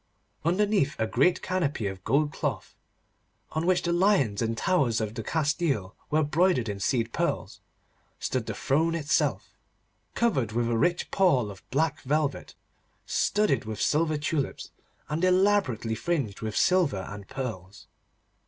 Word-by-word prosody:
Underneath 185 -3 +2
a 110 - +1
great 135 +10 +2
canopy 160 - -1
of 95 -1 -5
gold 145 +4 +1
cloth, - - -3 0.8
on 160 +2 -2
which 185 -1 +3
the 170 - 0
lions 175 - +2
and 115 0 -1
towers 135 -11 +2
of 110 -1 -3
Castile 140 - -1
were 155 +1 +2
broidered 150 -4 +2
in 100 -2 -4
seed 115 +2 0
pearls, - - -2 0.6
stood - - -2
the - - -3
throne 160 +5 +1
itself, 145 - 0 0.6
covered 135 - +1
with 120 0 0
a - - +1
rich 175 +9 0
pall 135 - +3
of 95 -1 -12
black 155 +2 0
velvet 145 +1 -1 0.5
studded 210 - +1
with 110 -1 -5
silver 155 0 +1
tulips 150 -1 -3 0.4
and 155 +3 -2
elaborately 185 - +2
fringed 115 - -2
with 110 -1 -3
silver 165 - +2
and 100 -1 -9
pearls. 105 -7 -6
145 Hz, 140 wpm, -27 LUFS, 115-170 Hz, 0.8 s, which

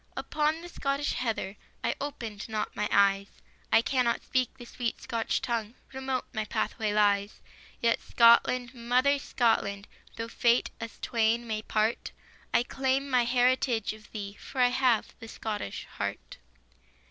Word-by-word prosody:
Upon 305 +2 0
the 350 - -8
Scottish 280 -3 -1
heather 215 -5 -2 0.3
I - - +1
opened 230 -8 -5
not 215 -1 -3
my 210 0 -1
eyes, 200 0 +4 0.4
I 225 - +6
cannot 250 -3 +1
speak 255 -2 +1
the 240 - -10
sweet 235 0 -3
Scotch 230 +3 -2
tongue, 230 -3 -2 0.2
Remote 265 -1 -2
my 220 -2 -1
pathway 215 0 -1
lies; 205 -1 +2 0.4
Yet 230 0 +2
Scotland, 235 +1 +4
mother 255 +4 +2
Scotland, 225 -6 0 0.3
Though 230 - -4
fate 235 +1 +2
us 230 0 -6
twain 230 0 +1
may 215 -2 -2
part, 215 +1 -1 0.4
I - - +3
claim 270 +2 -1
my 250 -2 +4
heritage 245 -2 +2
of 215 0 -15
thee, 200 -2 -6
For 265 - -7
I 250 -1 +6
have 250 -3 +2
the 225 - -9
Scottish 210 - -5
heart. - - -5
235 Hz, 145 wpm, -29 LUFS, 215-255 Hz, 0.4 s, I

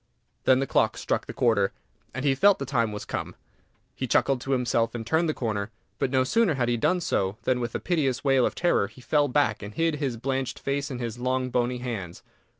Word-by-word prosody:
Then 130 - +6
the 135 - 0
clock - - +1
struck - - -2
the - - -5
quarter, 100 -5 +2 0.4
and 130 +4 -4
he 140 - +4
felt 200 +8 +5
the 140 - -4
time 115 -4 0
was 105 - -6
come. - - -4 0.6
He - - -3
chuckled 135 -3 +2
to 135 - -4
himself, 120 -2 +1
and 115 -1 -4
turned 160 +7 +1
the - - +1
corner; 105 -3 -2 0.3
but 135 - +1
no 130 0 +3
sooner 210 - +2
had 120 -2 0
he 120 - +2
done 180 +10 +1
so 95 - 0
than, 130 -1 +1
with 120 -2 -3
a - - 0
piteous 140 -8 0
wail 135 -2 +4
of - - 0
terror, 175 - +2
he 110 - -17
fell 145 +3 +2
back, 125 -5 +1
and 105 0 -8
hid 165 -2 +1
his 135 -5 -2
blanched 130 +1 -2
face 140 +1 -2
in 130 - -4
his 120 -1 -5
long, 130 0 -1
bony 125 0 0
hands. 110 -9 -5
130 Hz, 230 wpm, -26 LUFS, 115-140 Hz, 0.6 s, Then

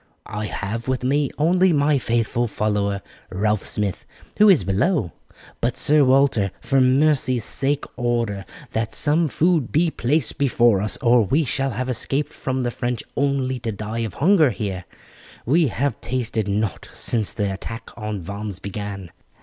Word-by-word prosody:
"I 105 0 -4
have 110 +4 -4
with 130 -1 -1
me 140 +2 +1
only 180 +4 +3
my 145 -2 +3
faithful 120 0 0
follower 100 -2 -1 0.3
Ralph 105 +1 0
Smith, 100 -3 -3 0.3
who 210 0 +6
is 175 - +5
below; 100 - 0 0.5
but, 120 +1 0
Sir 150 0 +4
Walter, 130 -6 +3
for 135 -1 +1
mercy's 130 -2 +3
sake 140 +2 +1
order 120 -5 -1 0.3
that 110 0 -2
some 155 +2 +2
food 160 -2 +1
be 160 +2 +2
placed 150 +5 -1
before 120 -7 +3
us, 105 - +1
or 120 -1 +5
we 145 +10 +1
shall 135 +3 -1
have 130 +2 -3
escaped 135 +4 -2
from 130 -1 -2
the 120 - -1
French 120 -1 -3
only 135 -2 0
to 115 -1 -3
die 110 +2 -5
of 115 -3 -3
hunger 160 -2 +4
here. 95 -5 -4 0.6
We 155 +5 +3
have 135 0 -2
tasted 115 -4 -2
nought 100 0 -2
since 110 -4 -1
the 100 -3 -1
attack 115 +4 -7
on 105 -4 -5
Vannes 100 +1 -5
began. 100 -2 -6
120 Hz, 160 wpm, -22 LUFS, 105-140 Hz, 0.6 s, who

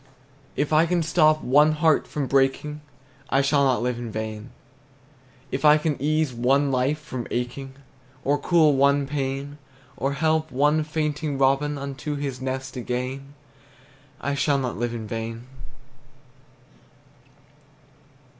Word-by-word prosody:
If 145 +2 -1
I 160 +2 +5
can 175 -1 +1
stop 155 -1 +3
one 150 +4 +4
heart 155 0 +2
from 145 -2 -3
breaking, 135 +3 0 0.5
I 135 +1 +2
shall 140 0 +3
not 130 -3 +2
live 125 -1 -1
in 120 -2 -6
vain; 110 +1 -5 1.0
If 135 - -3
I 150 0 +7
can 150 -1 -1
ease 155 -1 +1
one 135 +4 +2
life 140 +4 -1
the 125 -2 -4
aching, 130 +2 -4 0.5
Or 145 +1 +2
cool 155 -1 +4
one 140 +1 +3
pain, 140 +1 -4 0.4
Or 135 +1 -1
help 155 +1 +1
one 150 +4 +2
fainting 150 -1 -2
robin 135 +2 +2
Unto 140 +2 -5
his 140 -3 -4
nest 130 0 -4
again, 130 +3 -4 0.8
I 140 - -2
shall 140 0 +1
not 130 -3 -2
live 120 +1 -2
in 110 -2 -5
vain. 115 +2 -5
140 Hz, 135 wpm, -24 LUFS, 130-150 Hz, 1.0 s, I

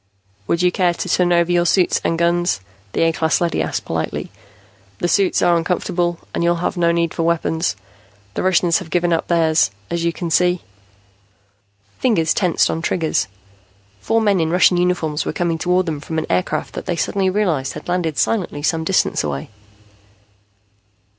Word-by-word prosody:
"Would 170 +1 +1
you 180 - +4
care 175 -1 +1
to - - -4
turn 180 0 +2
over 170 0 +3
your 175 0 +2
suits 185 0 +2
and 165 - 0
guns?" 175 - +1 0.3
the - - +1
A 165 - +3
class 160 -2 +1
leady 170 -1 0
asked - - -3
politely. - - -3 0.7
"The 175 - -1
suits 195 +1 +2
are 175 - +4
uncomfortable 175 0 -1 0.2
and - - -1
you'll 170 0 +3
have 170 +3 -2
no 170 -1 +2
need 170 -1 0
for - - -3
weapons. 165 -2 0 0.6
The - - -2
Russians 180 -2 +3
have 180 - -9
given 175 +1 +1
up 165 - -1
theirs, 160 - +3 0.2
as 170 -1 -1
you 170 - +1
can 170 -1 -5
see." 180 +2 +2 1.4
Fingers 170 -11 +2
tensed 180 -4 +2
on 165 - -3
triggers. 165 -2 0 0.7
Four 225 - +1
men 205 -3 +2
in 160 -1 +1
Russian 180 +1 +4
uniforms 170 -4 0
were - - -3
coming 170 -2 -1
toward 180 +2 +1
them 155 -4 -3
from 160 +2 -5
an 160 - -1
aircraft 90 0 -1
that - - -7
they - - 0
suddenly 195 -2 0
realized 175 -9 0
had - - -9
landed 175 -4 -1
silently 180 -9 -1
some 160 +1 0
distance 185 +3 +1
away. 70 +5 -4
170 Hz, 180 wpm, -19 LUFS, 165-180 Hz, 1.4 s, you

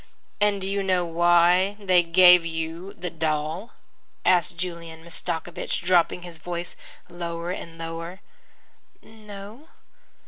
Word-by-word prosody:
"And 205 -1 +2
do 190 - -3
you 200 +1 -1
know 185 -2 +1
why 175 +3 +3
they 185 -3 +4
gave 180 +1 +7
you 165 +3 -5
the 180 0 -6
doll?" 160 +5 -2 0.5
asked 175 -1 +2
Julian 170 -2 -6
Mastakovich, 170 +1 -4
dropping 180 0 +2
his 170 -2 -10
voice 175 +1 -5 0.3
lower 170 0 -5
and 165 -3 -7
lower. 165 +2 -6 0.8
"No." 215 +5 -12
175 Hz, 115 wpm, -25 LUFS, 165-185 Hz, 0.8 s, gave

